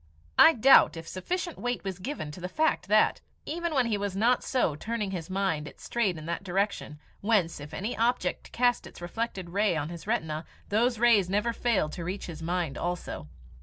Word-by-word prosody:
I 325 Hz, -, +9 dB
doubt 255 Hz, -6 st, +6 dB
if 165 Hz, -, -8 dB
sufficient 345 Hz, -, -3 dB
weight 245 Hz, 0 st, -2 dB
was 190 Hz, -1 st, -4 dB
given 185 Hz, -, -5 dB
to 180 Hz, -, -10 dB
the 180 Hz, -, -4 dB
fact 310 Hz, -8 st, +1 dB
that, 215 Hz, +2 st, +3 dB, 0.2 s
even 340 Hz, +2 st, -2 dB
when 260 Hz, -2 st, +3 dB
he 215 Hz, -3 st, 0 dB
was 200 Hz, -2 st, -3 dB
not 235 Hz, +5 st, +3 dB
so 245 Hz, -, +1 dB
turning 215 Hz, +3 st, -3 dB
his 175 Hz, -3 st, -5 dB
mind, 185 Hz, -6 st, -1 dB
it -, -, -12 dB
strayed 210 Hz, -8 st, -1 dB
in 155 Hz, -, -8 dB
that 170 Hz, +3 st, -3 dB
direction, 195 Hz, -5 st, -1 dB, 0.2 s
whence, 195 Hz, -7 st, +1 dB
if 145 Hz, +1 st, -9 dB
any 210 Hz, +5 st, -3 dB
object 240 Hz, +2 st, 0 dB
cast 245 Hz, 0 st, +1 dB
its -, -, -13 dB
reflected 185 Hz, 0 st, -4 dB
rays 200 Hz, -2 st, +2 dB
on 150 Hz, 0 st, -2 dB
his 170 Hz, -1 st, -9 dB
retina, 155 Hz, 0 st, -1 dB, 0.3 s
those 235 Hz, +3 st, +2 dB
rays 220 Hz, -5 st, +4 dB
never 210 Hz, +4 st, +1 dB
failed 220 Hz, -11 st, +1 dB
to 170 Hz, -, -6 dB
reach 185 Hz, +3 st, -4 dB
his 165 Hz, -2 st, -8 dB
mind 170 Hz, -3 st, -2 dB
also. 175 Hz, -, -4 dB
195 Hz, 200 wpm, -28 LUFS, 170-235 Hz, 0.3 s, I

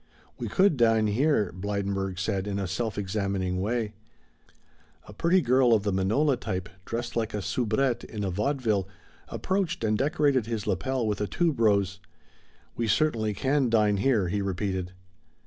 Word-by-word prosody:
"We -, -, -3 dB
could 190 Hz, -6 st, +3 dB
dine 115 Hz, -2 st, +4 dB
here," 105 Hz, -, +2 dB
Blydenburg 100 Hz, 0 st, -2 dB
said 95 Hz, +1 st, -1 dB
in 100 Hz, -1 st, -2 dB
a 100 Hz, -, -2 dB
self 110 Hz, +4 st, -3 dB
examining 95 Hz, -2 st, -1 dB
way. 110 Hz, +1 st, -1 dB, 1.1 s
A 105 Hz, -, -10 dB
pretty 170 Hz, -, +3 dB
girl 125 Hz, -2 st, +4 dB
of 105 Hz, -, 0 dB
the 105 Hz, -, 0 dB
manola 120 Hz, +9 st, +2 dB
type, 90 Hz, -1 st, -4 dB, 0.2 s
dressed 120 Hz, +1 st, -4 dB
like 110 Hz, -2 st, -1 dB
a 105 Hz, -, -2 dB
soubrette 120 Hz, +2 st, 0 dB
in 105 Hz, -2 st, -5 dB
a 95 Hz, -, -1 dB
vaudeville, 105 Hz, -1 st, 0 dB, 0.4 s
approached 190 Hz, -9 st, -2 dB
and 110 Hz, -1 st, +2 dB
decorated 140 Hz, -2 st, +1 dB
his 115 Hz, -2 st, -3 dB
lapel 130 Hz, -2 st, -1 dB
with 105 Hz, -1 st, -1 dB
a 105 Hz, -, 0 dB
tube 165 Hz, -, 0 dB
rose. 100 Hz, -4 st, +2 dB, 0.8 s
"We 115 Hz, -, -1 dB
certainly 110 Hz, -4 st, +1 dB
can 135 Hz, +1 st, +1 dB
dine 105 Hz, -3 st, +3 dB
here," 105 Hz, -5 st, +2 dB
he 100 Hz, +3 st, -1 dB
repeated. 95 Hz, -1 st, -2 dB
110 Hz, 160 wpm, -27 LUFS, 100-125 Hz, 1.1 s, dine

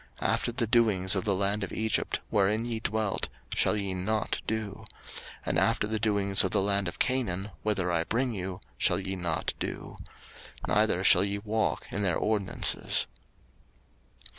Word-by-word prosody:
03:018:003 -, -, 0 dB
After -, -, -1 dB
the 120 Hz, -1 st, +1 dB
doings 105 Hz, -5 st, +3 dB
of 95 Hz, -, -1 dB
the 100 Hz, -2 st, +2 dB
land 100 Hz, +2 st, 0 dB
of 95 Hz, -, -4 dB
Egypt, 110 Hz, 0 st, -1 dB
wherein 105 Hz, +2 st, +2 dB
ye 115 Hz, -2 st, -2 dB
dwelt, 110 Hz, -2 st, -1 dB, 0.2 s
shall 105 Hz, -, +2 dB
ye 100 Hz, -2 st, -2 dB
not 105 Hz, +4 st, -1 dB
do: 110 Hz, -2 st, -3 dB, 0.6 s
and -, -, +2 dB
after -, -, +2 dB
the 110 Hz, 0 st, -1 dB
doings 100 Hz, -3 st, +3 dB
of 95 Hz, -, +1 dB
the -, -, +1 dB
land 100 Hz, -1 st, +1 dB
of 85 Hz, -, -5 dB
Canaan, 105 Hz, -7 st, -1 dB
whither 95 Hz, -4 st, 0 dB
I 85 Hz, -1 st, +1 dB
bring 125 Hz, +1 st, 0 dB
you, 95 Hz, -2 st, -4 dB, 0.2 s
shall -, -, +3 dB
ye 95 Hz, 0 st, -3 dB
not 85 Hz, -3 st, -1 dB
do: -, -, -5 dB, 0.7 s
neither -, -, +2 dB
shall -, -, +7 dB
ye 100 Hz, 0 st, -1 dB
walk 110 Hz, +1 st, -1 dB
in 100 Hz, -, -1 dB
their 90 Hz, -5 st, +2 dB
ordinances. 105 Hz, -3 st, +1 dB
100 Hz, 165 wpm, -29 LUFS, 95-110 Hz, 0.7 s, shall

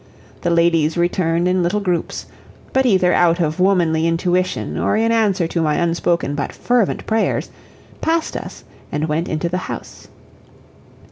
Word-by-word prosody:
The 175 Hz, -, 0 dB
ladies 170 Hz, -1 st, +2 dB
returned 170 Hz, 0 st, +1 dB
in 180 Hz, 0 st, +2 dB
little 175 Hz, +4 st, +1 dB
groups, 180 Hz, -4 st, -2 dB, 0.5 s
but 265 Hz, 0 st, +3 dB
either 185 Hz, -5 st, +3 dB
out 170 Hz, 0 st, +3 dB
of 155 Hz, 0 st, -1 dB
womanly 170 Hz, -4 st, +2 dB
intuition 180 Hz, +2 st, 0 dB
or -, -, +1 dB
in 225 Hz, +1 st, +2 dB
answer 205 Hz, -6 st, +2 dB
to 170 Hz, -, -1 dB
my 155 Hz, -2 st, +1 dB
unspoken 170 Hz, -2 st, 0 dB
but 145 Hz, -1 st, -3 dB
fervent 240 Hz, -5 st, 0 dB
prayers, 220 Hz, 0 st, 0 dB, 0.5 s
passed 325 Hz, 0 st, 0 dB
us -, -, -7 dB, 0.3 s
and 150 Hz, +2 st, -1 dB
went 160 Hz, +3 st, -1 dB
into 155 Hz, +2 st, -1 dB
the 180 Hz, +2 st, -2 dB
house. -, -, -8 dB
175 Hz, 150 wpm, -19 LUFS, 165-190 Hz, 0.5 s, but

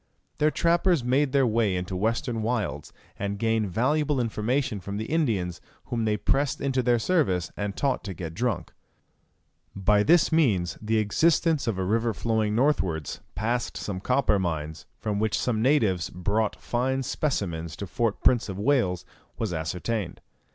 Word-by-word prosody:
Their 150 Hz, -, +4 dB
trappers 170 Hz, -2 st, +2 dB
made 135 Hz, +3 st, +2 dB
their 135 Hz, -1 st, +3 dB
way 110 Hz, -3 st, +2 dB
far -, -, 0 dB
into 90 Hz, +1 st, -5 dB
the -, -, -2 dB
western 115 Hz, +2 st, -1 dB
wilds, 110 Hz, -10 st, -2 dB, 0.3 s
and 100 Hz, 0 st, -2 dB
gained 110 Hz, -1 st, +1 dB
valuable 145 Hz, -, +1 dB
information 120 Hz, +1 st, -1 dB
from 100 Hz, +2 st, -5 dB
the 110 Hz, -, -3 dB
Indians 110 Hz, -, -1 dB, 0.2 s
whom 115 Hz, -2 st, -2 dB
they 105 Hz, -1 st, +1 dB
pressed 140 Hz, +6 st, 0 dB
into 135 Hz, -2 st, 0 dB
their 120 Hz, -1 st, +3 dB
service, 110 Hz, -, +1 dB
and 100 Hz, -1 st, -4 dB
taught 140 Hz, -2 st, 0 dB
to 95 Hz, -3 st, -5 dB
get 80 Hz, -1 st, -6 dB
drunk. 115 Hz, 0 st, -2 dB, 1.0 s
By 105 Hz, +1 st, +3 dB
this 165 Hz, +10 st, +4 dB
means 110 Hz, -, +2 dB
the 110 Hz, +1 st, 0 dB
existence 155 Hz, +6 st, +2 dB
of 110 Hz, -5 st, 0 dB
a 95 Hz, -, -1 dB
river 115 Hz, +2 st, +1 dB
flowing 110 Hz, -2 st, 0 dB
northwards, 95 Hz, -, 0 dB, 0.2 s
past 120 Hz, +2 st, -1 dB
some 95 Hz, -3 st, -4 dB
copper 125 Hz, -1 st, +2 dB
mines, 80 Hz, -4 st, -3 dB
from 105 Hz, -2 st, -2 dB
which 110 Hz, -1 st, +1 dB
some 115 Hz, -3 st, 0 dB
natives 110 Hz, -, +2 dB
brought 100 Hz, +5 st, -1 dB
fine 130 Hz, +2 st, -1 dB
specimens 85 Hz, -, -2 dB
to 100 Hz, -, -5 dB
Fort 110 Hz, +3 st, -2 dB
Prince 120 Hz, -4 st, +3 dB
of 95 Hz, -, -5 dB
Wales, 100 Hz, -6 st, +1 dB, 0.3 s
was 110 Hz, -6 st, -2 dB
ascertained. 90 Hz, +4 st, -3 dB
110 Hz, 165 wpm, -26 LUFS, 95-130 Hz, 1.0 s, Their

